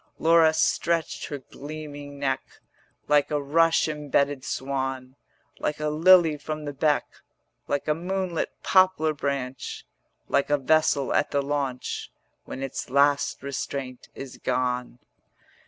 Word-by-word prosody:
80 -, -, -16 dB
Laura 165 Hz, -1 st, +6 dB
stretched 165 Hz, +1 st, 0 dB
her 145 Hz, -, -4 dB
gleaming 145 Hz, +1 st, -9 dB
neck 135 Hz, -1 st, 0 dB, 0.7 s
Like 145 Hz, -1 st, +3 dB
a 150 Hz, -, 0 dB
rush 160 Hz, +4 st, +3 dB
imbedded 145 Hz, -2 st, 0 dB
swan, 130 Hz, -1 st, -3 dB, 0.4 s
Like 150 Hz, -, -2 dB
a 150 Hz, 0 st, 0 dB
lily 165 Hz, 0 st, +5 dB
from 155 Hz, +1 st, -5 dB
the 145 Hz, -, -4 dB
beck, 145 Hz, +1 st, +2 dB, 0.6 s
Like 145 Hz, -, -2 dB
a 150 Hz, -, +3 dB
moonlit 180 Hz, +1 st, -2 dB
poplar 185 Hz, -5 st, +4 dB
branch, 140 Hz, -3 st, -4 dB, 0.4 s
Like 140 Hz, -, +1 dB
a 145 Hz, -, +3 dB
vessel 145 Hz, 0 st, +2 dB
at -, -, +2 dB
the 140 Hz, -1 st, 0 dB
launch 140 Hz, -3 st, -3 dB, 0.3 s
When 135 Hz, -, -6 dB
its 135 Hz, -1 st, -5 dB
last 140 Hz, +2 st, +2 dB
restraint 135 Hz, -2 st, -5 dB
is 135 Hz, -2 st, -8 dB
gone. 125 Hz, -1 st, -1 dB
145 Hz, 130 wpm, -26 LUFS, 135-155 Hz, 0.7 s, Laura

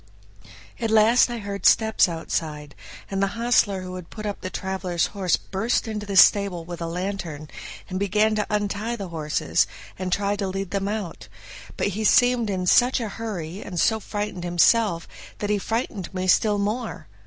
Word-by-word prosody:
At 230 Hz, -2 st, -1 dB
last 220 Hz, +3 st, +5 dB
I 240 Hz, -, -3 dB
heard 200 Hz, -2 st, -1 dB
steps 220 Hz, -4 st, +4 dB
outside, 155 Hz, -3 st, -4 dB, 0.4 s
and 195 Hz, 0 st, -1 dB
the 195 Hz, +3 st, -1 dB
hostler 220 Hz, -5 st, +2 dB
who 185 Hz, 0 st, -7 dB
had 180 Hz, -3 st, -10 dB
put 215 Hz, -1 st, -8 dB
up 205 Hz, -1 st, -4 dB
the 185 Hz, -, -4 dB
traveler's 185 Hz, -3 st, -2 dB
horse 190 Hz, -4 st, +1 dB
burst 220 Hz, +5 st, -1 dB
into 210 Hz, -2 st, -4 dB
the 200 Hz, -, -3 dB
stable 190 Hz, -4 st, +5 dB
with 175 Hz, 0 st, -7 dB
a 165 Hz, -, -2 dB
lantern, 170 Hz, -4 st, -4 dB, 0.4 s
and 185 Hz, 0 st, -4 dB
began 210 Hz, +2 st, +2 dB
to 210 Hz, -1 st, -1 dB
untie 210 Hz, +2 st, -1 dB
the 200 Hz, -5 st, -6 dB
horses, 155 Hz, -3 st, 0 dB, 0.3 s
and 185 Hz, -1 st, -3 dB
try 200 Hz, +2 st, +1 dB
to 195 Hz, -1 st, -2 dB
lead 195 Hz, 0 st, -4 dB
them 200 Hz, 0 st, -1 dB
out; 205 Hz, -4 st, -4 dB, 0.5 s
but -, -, +1 dB
he 210 Hz, +3 st, -3 dB
seemed 245 Hz, 0 st, +4 dB
in 185 Hz, -2 st, -2 dB
such 245 Hz, +8 st, +4 dB
a 225 Hz, -3 st, -3 dB
hurry 195 Hz, -5 st, -5 dB
and 180 Hz, -3 st, -5 dB
so 220 Hz, +5 st, +3 dB
frightened 205 Hz, -4 st, -4 dB
himself 175 Hz, +1 st, +3 dB, 0.3 s
that 205 Hz, 0 st, -2 dB
he 205 Hz, -, +1 dB
frightened 225 Hz, -3 st, -3 dB
me 185 Hz, 0 st, -1 dB
still 205 Hz, +3 st, +3 dB
more. 215 Hz, +4 st, -3 dB
200 Hz, 180 wpm, -24 LUFS, 180-215 Hz, 0.5 s, last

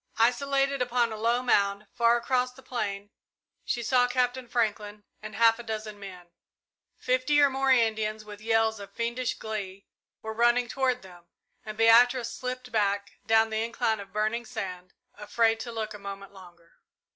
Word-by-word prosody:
Isolated 275 Hz, +3 st, +1 dB
upon 245 Hz, -1 st, +1 dB
a -, -, -4 dB
low 235 Hz, +3 st, 0 dB
mound, 200 Hz, -3 st, +1 dB
far 235 Hz, -1 st, +3 dB
across 250 Hz, +1 st, 0 dB
the 260 Hz, +1 st, -17 dB
plain, 205 Hz, -4 st, -4 dB, 0.5 s
she 240 Hz, -, -2 dB
saw 245 Hz, +1 st, +3 dB
Captain 250 Hz, 0 st, -1 dB
Franklin 210 Hz, -3 st, -2 dB, 0.2 s
and 215 Hz, -1 st, -8 dB
half 230 Hz, 0 st, +4 dB
a -, -, -7 dB
dozen 215 Hz, -2 st, -6 dB
men. 180 Hz, -3 st, -11 dB, 0.7 s
Fifty 255 Hz, +4 st, +1 dB
or 285 Hz, -1 st, +5 dB
more 270 Hz, 0 st, 0 dB
Indians, 220 Hz, -3 st, +1 dB
with 210 Hz, 0 st, -11 dB
yells 225 Hz, -1 st, +1 dB
of 200 Hz, -, -10 dB
fiendish 235 Hz, +1 st, -2 dB
glee, 200 Hz, -3 st, -6 dB, 0.4 s
were 220 Hz, 0 st, -4 dB
running 240 Hz, +2 st, +3 dB
toward 255 Hz, -1 st, -1 dB
them, 175 Hz, -2 st, -15 dB, 0.4 s
and 215 Hz, 0 st, -8 dB
Beatrice 235 Hz, +1 st, +5 dB
slipped 255 Hz, 0 st, -6 dB
back, 200 Hz, -2 st, -1 dB
down 225 Hz, 0 st, +4 dB
the 220 Hz, 0 st, 0 dB
incline 225 Hz, -1 st, -1 dB
of 200 Hz, -1 st, -10 dB
burning 215 Hz, +3 st, -1 dB
sand, 190 Hz, -6 st, -7 dB, 0.2 s
afraid 225 Hz, +2 st, +1 dB
to 235 Hz, -, -6 dB
look 220 Hz, -1 st, -4 dB
a 210 Hz, -, -9 dB
moment 200 Hz, 0 st, -8 dB
longer. 175 Hz, -3 st, -17 dB
225 Hz, 165 wpm, -27 LUFS, 210-245 Hz, 0.7 s, or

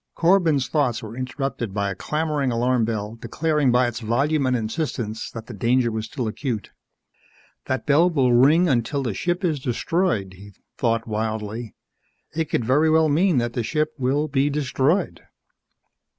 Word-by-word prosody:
_ -, -, -58 dB
Corbin's 165 Hz, -6 st, +3 dB
thoughts 130 Hz, -7 st, 0 dB
were 110 Hz, +1 st, -8 dB
interrupted 130 Hz, -4 st, -4 dB
by 100 Hz, -1 st, 0 dB
a -, -, -5 dB
clamoring 150 Hz, +2 st, -1 dB
alarm 120 Hz, 0 st, +1 dB
bell 110 Hz, 0 st, -4 dB
declaring 150 Hz, -4 st, +1 dB
by 125 Hz, +1 st, +4 dB
its 120 Hz, 0 st, -3 dB
volume 135 Hz, +5 st, +1 dB
and 130 Hz, -, +2 dB
insistence 115 Hz, -2 st, -3 dB
that 115 Hz, -1 st, -8 dB
the 125 Hz, -, -9 dB
danger 120 Hz, +3 st, +1 dB
was 110 Hz, 0 st, -3 dB
still 120 Hz, 0 st, -4 dB
acute. 115 Hz, -1 st, -4 dB, 0.9 s
That 130 Hz, 0 st, -2 dB
bell 160 Hz, +4 st, +4 dB
will 135 Hz, -7 st, +2 dB
ring 150 Hz, +9 st, +5 dB
until 135 Hz, +1 st, 0 dB
the 120 Hz, -5 st, -2 dB
ship 175 Hz, -, -1 dB
is 155 Hz, -4 st, 0 dB
destroyed, 125 Hz, -, -1 dB
he 100 Hz, +2 st, -13 dB, 0.2 s
thought 115 Hz, -2 st, 0 dB
wildly. 110 Hz, +1 st, -3 dB, 0.6 s
_It 160 Hz, -2 st, -1 dB
could 115 Hz, -, 0 dB
very 145 Hz, +6 st, +3 dB
well 160 Hz, 0 st, +4 dB
mean 170 Hz, +2 st, +3 dB
that 120 Hz, -1 st, 0 dB
the 120 Hz, -, -1 dB
ship 155 Hz, +6 st, -1 dB
will 140 Hz, +4 st, +1 dB
be 140 Hz, 0 st, +1 dB
destroyed! 145 Hz, +4 st, 0 dB
130 Hz, 165 wpm, -23 LUFS, 115-150 Hz, 0.9 s, ring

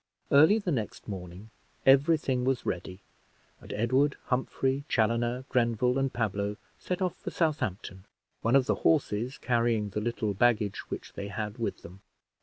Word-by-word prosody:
Early 155 Hz, +9 st, +7 dB
the 200 Hz, -5 st, -2 dB
next 115 Hz, -7 st, -3 dB
morning 95 Hz, +1 st, -8 dB, 0.3 s
every 140 Hz, +5 st, +6 dB
thing 130 Hz, -4 st, -1 dB
was 130 Hz, -1 st, 0 dB
ready, 90 Hz, +2 st, -4 dB, 0.6 s
and -, -, -11 dB
Edward, 130 Hz, +6 st, +2 dB
Humphrey, 130 Hz, +2 st, 0 dB
Chaloner, 120 Hz, +3 st, +1 dB
Grenville, 125 Hz, +1 st, +1 dB
and 135 Hz, -1 st, 0 dB
Pablo 105 Hz, -2 st, -2 dB, 0.2 s
set 180 Hz, +1 st, -2 dB
off 180 Hz, -, -1 dB
for -, -, -6 dB
Southampton, 110 Hz, -, -2 dB, 0.4 s
one 115 Hz, +3 st, +2 dB
of 135 Hz, -2 st, +5 dB
the -, -, -1 dB
horses 130 Hz, -4 st, +1 dB
carrying 115 Hz, -3 st, +1 dB
the 105 Hz, +2 st, -3 dB
little 110 Hz, -2 st, -1 dB
baggage 105 Hz, -1 st, +1 dB
which -, -, -6 dB
they 100 Hz, -, -5 dB
had 105 Hz, +3 st, -5 dB
with 115 Hz, -, -3 dB
them. 95 Hz, +3 st, -12 dB
120 Hz, 155 wpm, -29 LUFS, 105-135 Hz, 0.6 s, Early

